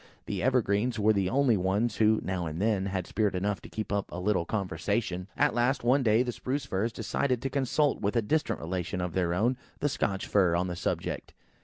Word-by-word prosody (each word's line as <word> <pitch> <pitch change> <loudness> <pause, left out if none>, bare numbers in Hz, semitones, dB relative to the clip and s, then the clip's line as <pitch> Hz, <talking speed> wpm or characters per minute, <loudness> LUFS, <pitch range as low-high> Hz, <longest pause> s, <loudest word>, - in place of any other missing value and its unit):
The - - -3
evergreens 120 -2 +1
were 110 +1 +4
the 95 -3 +1
only 130 -1 +3
ones 100 +5 0
who, 110 0 +4
now 90 -3 -2
and 80 +2 -5
then, 100 -2 +1
had 95 -2 -2
spirit 105 -1 0
enough 100 0 -1
to - - -11
keep 110 -2 -4
up 100 -1 -1
a 85 - -5
little 95 -2 +1
conversation. 95 -1 -2
At - - +3
last, 120 +3 +1
one 130 +4 +4
day, 115 0 +4
the 125 - -2
Spruce 135 +4 -3
firs 110 -1 -1
decided 125 +3 -1
to 135 - -2
consult 140 +1 +1
with 105 +3 0
a 115 - +2
distant 155 +8 0
relation 90 +2 -3
of 90 -2 -3
their 85 -1 +1
own, 120 +7 +1 0.2
the 145 - +1
Scotch 95 -7 -1
fir, 90 -4 +3
on 90 +1 +1
the 90 -1 -3
subject. - - -3
105 Hz, 215 wpm, -29 LUFS, 95-120 Hz, 0.2 s, were